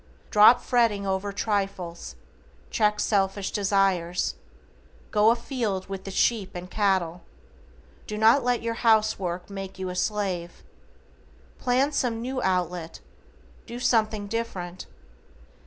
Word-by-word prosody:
Drop 215 Hz, +4 st, +7 dB
fretting 230 Hz, -6 st, +1 dB
over 190 Hz, +1 st, -1 dB
trifles, 195 Hz, -4 st, -3 dB, 0.6 s
check 210 Hz, -1 st, +2 dB
selfish 195 Hz, -1 st, 0 dB
desires, 195 Hz, -4 st, +1 dB, 0.8 s
go 210 Hz, +1 st, +5 dB
afield 230 Hz, -5 st, -1 dB
with 195 Hz, -1 st, -6 dB
the -, -, -5 dB
sheep 195 Hz, -1 st, 0 dB
and 180 Hz, +1 st, -7 dB
cattle, 185 Hz, -5 st, 0 dB, 0.9 s
do 210 Hz, -, -4 dB
not 225 Hz, +5 st, +5 dB
let 245 Hz, -1 st, 0 dB
your 230 Hz, 0 st, -1 dB
house 220 Hz, -2 st, +3 dB
work 180 Hz, -1 st, -4 dB
make 195 Hz, -1 st, -7 dB
you 190 Hz, -1 st, -4 dB
a 180 Hz, -, -5 dB
slave. 185 Hz, -3 st, -2 dB, 1.0 s
PLAN 260 Hz, +3 st, +2 dB
some 245 Hz, -5 st, -1 dB
new 255 Hz, +2 st, -3 dB
outlet, 180 Hz, -4 st, -1 dB, 0.7 s
do 240 Hz, +1 st, -6 dB
something 215 Hz, -4 st, +1 dB
different. 195 Hz, -5 st, -5 dB
200 Hz, 120 wpm, -26 LUFS, 185-230 Hz, 1.0 s, Drop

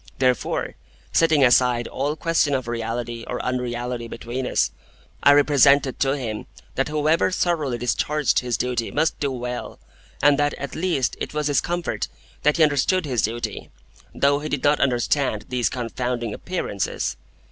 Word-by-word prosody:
Therefore, 130 Hz, -2 st, 0 dB, 0.4 s
setting 160 Hz, -4 st, +4 dB
aside 120 Hz, -1 st, +4 dB
all 145 Hz, +3 st, -2 dB
question 160 Hz, -3 st, +1 dB
of 130 Hz, -2 st, -3 dB
reality 115 Hz, 0 st, -3 dB
or -, -, -3 dB
unreality 125 Hz, -1 st, -3 dB
between 120 Hz, +3 st, -5 dB
us, -, -, +1 dB, 0.5 s
I 140 Hz, -, +7 dB
represented 140 Hz, -2 st, +4 dB
to 135 Hz, +1 st, +1 dB
him 110 Hz, -5 st, -5 dB, 0.3 s
that 135 Hz, -, 0 dB
whoever 155 Hz, +2 st, +2 dB
thoroughly 160 Hz, -9 st, 0 dB
discharged 145 Hz, +5 st, +1 dB
his 125 Hz, -2 st, -2 dB
duty 125 Hz, -2 st, -1 dB
must 160 Hz, +2 st, 0 dB
do 145 Hz, -, 0 dB
well, 125 Hz, -1 st, -5 dB, 0.4 s
and 145 Hz, 0 st, +4 dB
that 145 Hz, -1 st, +1 dB
at 140 Hz, -, -6 dB
least 165 Hz, -7 st, 0 dB
it -, -, -5 dB
was 150 Hz, 0 st, 0 dB
his 145 Hz, -1 st, +2 dB
comfort 175 Hz, 0 st, -2 dB, 0.3 s
that 150 Hz, +2 st, +3 dB
he 165 Hz, -, +5 dB
understood 155 Hz, +5 st, +2 dB
his 125 Hz, -6 st, 0 dB
duty, 115 Hz, +2 st, -3 dB, 0.4 s
though 140 Hz, +1 st, +2 dB
he 155 Hz, +1 st, -5 dB
did 145 Hz, -, -2 dB
not 145 Hz, +1 st, +3 dB
understand 125 Hz, -3 st, +1 dB
these 125 Hz, -2 st, +1 dB
confounding 120 Hz, -2 st, -3 dB
Appearances. 140 Hz, -, -3 dB
130 Hz, 155 wpm, -23 LUFS, 120-150 Hz, 0.5 s, I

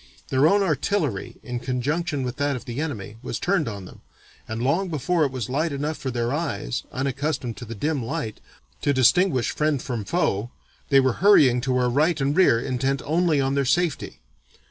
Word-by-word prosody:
Their 135 Hz, +3 st, +4 dB
own 200 Hz, +4 st, +4 dB
artillery 155 Hz, -, -1 dB
in 125 Hz, -1 st, -4 dB
conjunction 135 Hz, +4 st, -2 dB
with 125 Hz, -1 st, -4 dB
that 145 Hz, -1 st, 0 dB
of 125 Hz, -, -7 dB
the 120 Hz, +3 st, -4 dB
enemy, 110 Hz, -9 st, -5 dB
was -, -, -4 dB
turned 180 Hz, -5 st, 0 dB
on 100 Hz, -4 st, -6 dB
them, -, -, -14 dB, 0.5 s
and 110 Hz, +1 st, -4 dB
long 155 Hz, +10 st, +1 dB
before 160 Hz, +2 st, 0 dB
it 135 Hz, -, -2 dB
was 130 Hz, -5 st, -4 dB
light 150 Hz, +5 st, -1 dB
enough 145 Hz, +3 st, -2 dB
for 135 Hz, -, -5 dB
their 120 Hz, 0 st, -1 dB
eyes, 145 Hz, -, -2 dB
unaccustomed 135 Hz, -2 st, -2 dB
to 120 Hz, -, -7 dB
the 115 Hz, +1 st, -7 dB
dim 145 Hz, +4 st, -1 dB
light, 115 Hz, -4 st, -4 dB, 0.4 s
to 145 Hz, -, +2 dB
distinguish 130 Hz, +1 st, +3 dB
friend 150 Hz, -2 st, 0 dB
from 120 Hz, -4 st, -4 dB
foe, 110 Hz, -, 0 dB, 0.4 s
they 135 Hz, -, +6 dB
were 130 Hz, -2 st, +2 dB
hurrying 140 Hz, -12 st, +6 dB
to 130 Hz, -1 st, 0 dB
our 125 Hz, -1 st, +2 dB
right 150 Hz, +6 st, +2 dB
and 140 Hz, +2 st, 0 dB
rear 170 Hz, -11 st, +5 dB
intent 135 Hz, +2 st, -1 dB
only 160 Hz, 0 st, +2 dB
on 135 Hz, 0 st, +1 dB
their 140 Hz, 0 st, +1 dB
safety. 165 Hz, +3 st, -1 dB
135 Hz, 190 wpm, -24 LUFS, 125-155 Hz, 0.5 s, they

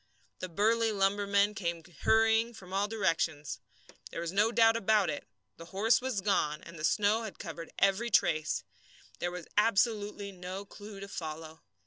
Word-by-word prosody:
The 185 Hz, -, -5 dB
burly 225 Hz, +5 st, +2 dB
lumbermen 200 Hz, 0 st, +2 dB
came 170 Hz, -4 st, -3 dB, 0.2 s
hurrying 225 Hz, +1 st, +3 dB
from 185 Hz, -3 st, -11 dB
all 200 Hz, +1 st, +1 dB
directions. 160 Hz, -8 st, -1 dB, 0.5 s
There -, -, -6 dB
was 170 Hz, 0 st, -3 dB
no 205 Hz, +4 st, +3 dB
doubt 225 Hz, -1 st, +5 dB
about 210 Hz, -5 st, +2 dB
it 145 Hz, -, -6 dB, 0.3 s
the 165 Hz, -, -10 dB
horse 205 Hz, +8 st, +2 dB
was 250 Hz, -6 st, -2 dB
gone, 150 Hz, -7 st, 0 dB
and 170 Hz, -1 st, -11 dB
the -, -, -7 dB
snow 210 Hz, +6 st, +2 dB
had 220 Hz, -3 st, -7 dB
covered 165 Hz, -2 st, -7 dB
every 195 Hz, +5 st, +2 dB
trace. 165 Hz, -7 st, +2 dB, 0.6 s
There 175 Hz, -, -1 dB
was 180 Hz, -1 st, -7 dB
absolutely 210 Hz, -1 st, +1 dB
no 185 Hz, +1 st, -7 dB
clue 205 Hz, 0 st, -11 dB
to 200 Hz, -, -6 dB
follow. 160 Hz, -3 st, -7 dB
200 Hz, 160 wpm, -31 LUFS, 170-215 Hz, 0.6 s, doubt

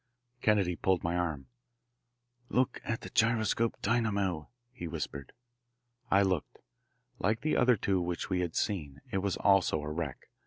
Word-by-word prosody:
Kennedy 100 Hz, -5 st, +3 dB
pulled 95 Hz, 0 st, +1 dB
my 85 Hz, +1 st, 0 dB
arm. 80 Hz, -6 st, -1 dB, 1.0 s
"Look 130 Hz, +1 st, +1 dB
at 115 Hz, -1 st, -2 dB
the -, -, -8 dB
gyroscope 115 Hz, 0 st, +2 dB
dynamo," 100 Hz, -8 st, 0 dB, 0.2 s
he 85 Hz, -9 st, -6 dB
whispered. 70 Hz, -4 st, -5 dB, 0.8 s
I 100 Hz, +1 st, +5 dB
looked. 95 Hz, -5 st, -1 dB, 0.6 s
Like 110 Hz, +4 st, +1 dB
the 155 Hz, -, +1 dB
other 125 Hz, 0 st, +5 dB
two 95 Hz, -1 st, +1 dB
which 85 Hz, 0 st, -2 dB
we 90 Hz, -2 st, 0 dB
had 85 Hz, -3 st, -2 dB
seen, 75 Hz, -10 st, -2 dB
it 100 Hz, -, 0 dB
also 95 Hz, -3 st, +3 dB
was 75 Hz, 0 st, -5 dB
a 75 Hz, -, -3 dB
wreck. 80 Hz, -4 st, -5 dB
95 Hz, 150 wpm, -31 LUFS, 85-110 Hz, 1.0 s, I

